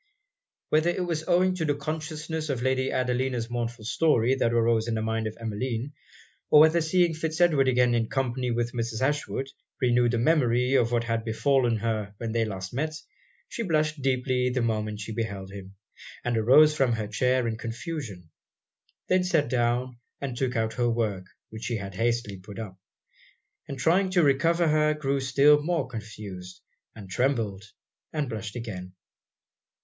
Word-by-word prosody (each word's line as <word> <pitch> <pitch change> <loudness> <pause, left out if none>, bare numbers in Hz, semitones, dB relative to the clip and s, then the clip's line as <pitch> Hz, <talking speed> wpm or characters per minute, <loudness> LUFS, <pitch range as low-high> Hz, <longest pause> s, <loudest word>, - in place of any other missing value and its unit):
Whether 155 +3 +3
it 180 +1 -1
was 160 -2 -3
owing 185 +1 +3
to 160 - -1
the 145 -2 +1
consciousness 155 +1 -4
of 125 -3 -2
Lady 130 0 +1
Adelina's 125 -1 -1
mournful 120 -2 -4
story 130 -2 +2
that 130 -3 +1
arose 115 -1 +2
in 115 - -1
the 110 - -1
mind 110 0 -1
of 110 - -7
Emmeline, 115 +4 -3 0.6
or 150 - +7
whether 160 +2 +5
seeing 170 +1 +2
Fitz 160 0 -3
Edward 155 -6 +4
again 125 -1 +3
in 115 -1 0
company 130 -1 -1
with 120 0 -1
Mrs. 115 -1 -3
Ashwood 135 -1 -1 0.3
renewed 120 -2 +3
the 120 - 0
memory 125 -2 +2
of 120 -3 +3
what 120 -1 +1
had 115 -1 -1
befallen 120 +1 +2
her 110 -2 -3
when 115 0 -4
they 115 0 +1
last 95 -2 -6
met, 155 +5 -2 0.5
she - - -5
blushed 155 -6 0
deeply 130 -1 +1
the 125 -1 -1
moment 110 -2 -2
she 110 - -6
beheld 100 -4 -4
him, 100 -1 -10 0.5
and 120 -1 0
arose 140 +7 +6
from 130 -5 +2
her 110 -1 -2
chair 125 +3 +1
in 115 - -2
confusion; 115 - -6 0.8
then 185 0 +3
sat 165 -8 +1
down 120 0 0 0.2
and 135 -3 -4
took 125 0 -1
out 110 -1 0
her 120 0 +1
work, 110 -5 -1 0.3
which 110 0 -7
she 120 - -1
had 100 -1 -6
hastily 115 -1 -1
put 100 +2 -11
up; 105 -5 -6 0.9
and 135 - -6
trying 180 +8 +2
to 180 -2 +3
recover 165 +5 +3
herself, 155 0 +2
grew 140 -1 0
still 140 +3 +4
more 165 -2 -1
confused, 105 -6 -8 0.4
and 105 -3 -10
trembled 105 -2 -1 0.5
and 150 -3 -2
blushed 110 -1 -5
again. 95 -6 -6
125 Hz, 170 wpm, -27 LUFS, 115-150 Hz, 0.9 s, or